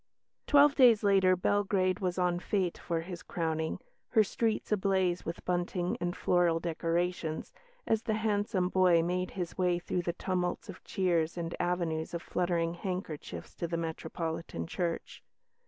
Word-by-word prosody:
Twelve 290 0 +6
days 245 -6 +6
later, 190 -2 +5
Belgrade 190 0 +1
was 180 -2 -1
en 180 -1 +1
fête 185 -2 0
for 165 -1 -2
his 175 0 -7
crowning, 160 -1 -2 0.3
her 220 -3 +5
streets 220 +2 -1
ablaze 190 -3 +1
with 165 - -6
bunting 175 0 -1
and 175 0 -2
floral 175 -2 +2
decorations, 170 0 -2 0.3
as 220 -1 +1
the 225 -2 -1
handsome 205 -3 0
boy 180 -3 +4
made 180 +1 -1
his 180 0 -4
way 180 -1 +3
through 175 +1 -2
the 170 0 -2
tumults 180 +1 -2
of 190 - -9
cheers 170 -3 0
and 170 0 -3
avenues 170 -2 -1
of 170 - -4
fluttering 170 -2 0
handkerchiefs 180 -3 -5
to 170 - -3
the 170 0 -2
Metropolitan 160 - -4
Church. 170 - -3
180 Hz, 150 wpm, -31 LUFS, 170-190 Hz, 0.3 s, Twelve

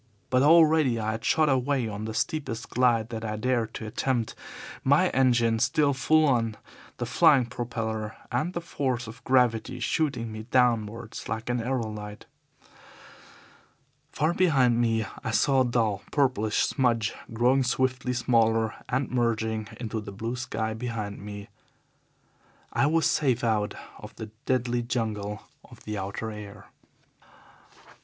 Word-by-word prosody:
But 130 0 +4
already 155 -5 +5
I 110 0 -1
had 110 +1 -5
shot 155 +4 +3
away 135 -2 +1
on 105 0 -5
the 110 0 -5
steepest 130 -7 -3
glide 120 -3 +2
that 115 -2 -5
I 110 -1 -3
dared 115 0 -1
to 110 - -5
attempt, 115 +1 -1 0.5
my 145 +7 +4
engine 120 -3 +2
still 140 +5 +2
full 155 +4 +3
on, 115 -6 +1 0.4
the - - -2
flying 135 -4 +5
propeller 115 -3 -4 0.2
and 150 +9 -1
the 170 - -3
force 130 -7 -2
of 115 +2 -11
gravity 125 -4 +2
shooting 125 -8 -1
me 110 +1 -8
downwards 115 -2 0
like 115 +2 -3
an 120 - 0
aerolite. 110 -4 -4 1.9
Far 155 +3 +1
behind 130 -10 +3
me 115 -1 +1 0.2
I - - -2
saw 135 +4 +3
a - - +3
dull, 115 -5 0
purplish 125 -7 +1
smudge 115 -5 +1 0.2
growing 125 +4 +3
swiftly 130 0 0
smaller 115 -2 +2 0.2
and 130 +1 -1
merging 110 -3 0
into 110 -2 -3
the 105 -1 -8
blue 115 +5 -4
sky 110 -3 -3
behind 110 -3 -5
it. 100 0 -8 1.3
I 140 - +3
was 160 +1 +2
safe 130 -5 +1
out 110 -3 0 0.2
of - - -11
the 110 -1 -8 0.2
deadly 120 -1 +1
jungle 110 -4 -3 0.2
of - - -16
the 105 -1 -4
outer 100 +3 -4
air. 105 -1 -10
120 Hz, 140 wpm, -27 LUFS, 110-130 Hz, 1.9 s, already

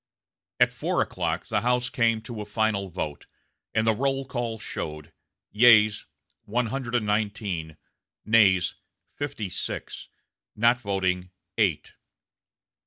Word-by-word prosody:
At - - +5
four - - 0
o'clock - - -3
the - - 0
House 125 +1 +1
came 115 -2 +2
to 115 -2 -6
a - - -5
final 105 -2 0
vote, 75 -4 -5 0.4
and 110 +1 +1
the 110 - +4
roll 135 +3 -1
call 120 -3 -3
showed: 75 -7 -6 0.4
yeas, 110 -2 +6 0.4
one 120 +4 0
hundred 125 +1 -3
and 115 -3 +1
nineteen; 100 -7 -2 0.5
nays, 100 -5 +4 0.4
fifty 145 -8 -4
six; 90 - -5 0.5
not 120 +3 +3
voting, 95 -4 -1 0.3
eight. 90 -9 +1
110 Hz, 120 wpm, -26 LUFS, 95-120 Hz, 0.5 s, yeas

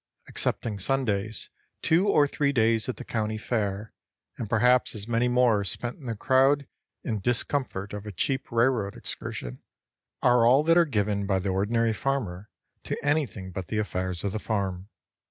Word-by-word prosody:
Excepting 105 -3 -2
Sundays, 110 -3 -1 0.3
two 175 +5 +3
or 150 -7 +4
three 140 0 0
days 115 -2 +2
at 125 - -3
the - - -7
county 110 -1 -2
fair, 105 -2 -2 0.4
and 110 - -5
perhaps 125 +2 +3
as 105 0 -4
many 120 +1 +2
more 125 -4 +3
spent 120 - -5
in 135 - -10
the 115 - -2
crowd 135 +5 +3 0.4
and 110 -4 -2
discomfort 120 -3 -1
of 105 +1 -6
a - - -4
cheap 130 +8 -1
railroad 115 -4 +1
excursion, 60 0 -6 0.6
are 125 -1 +5
all 130 +5 +5
that 165 +1 +4
are 175 -1 +6
given 105 -6 0
by 95 -1 +2
the 95 +1 -2
ordinary 110 +4 +1
farmer 105 -7 -2 0.3
to - - -3
anything 135 - 0
but 90 -1 -5
the 110 - -2
affairs 95 -4 -2
of 100 - -1
the 110 - -3
farm. 100 -3 -2
110 Hz, 170 wpm, -27 LUFS, 100-130 Hz, 0.6 s, are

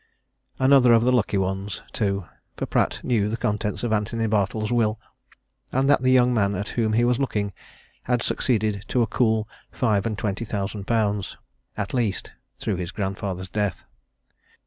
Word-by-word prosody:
Another 130 -2 +6
of 115 0 +5
the 125 - +3
lucky 110 -5 +2
ones, 95 +1 -2
too; 100 -3 -1 0.3
for - - -2
Pratt - - 0
knew 110 -5 +1
the 115 - -2
contents 105 0 -2
of 120 -2 0
Antony 115 +2 0
Bartle's 110 +1 0
will, 110 -2 +1 0.7
and 135 +1 +1
that 145 - +4
the 130 - +2
young 125 -1 +5
man 100 -3 +1
at 100 +3 -3
whom 110 -2 0
he 115 +2 +3
was 120 +1 +2
looking 105 -7 -1 0.5
had 120 -1 +1
succeeded 105 -4 0
to 125 - +2
a - - +2
cool 110 -1 +1 0.2
five 110 -5 +1
and 110 -2 -3
twenty 105 +1 -2
thousand 100 -2 -4
pounds, 105 -4 0 0.4
at 100 -2 -3
least, 115 -6 -1 0.3
through - - -2
his 90 -1 -4
grandfather's 95 -2 -4
death. 105 -4 -2
110 Hz, 170 wpm, -24 LUFS, 100-120 Hz, 0.7 s, Another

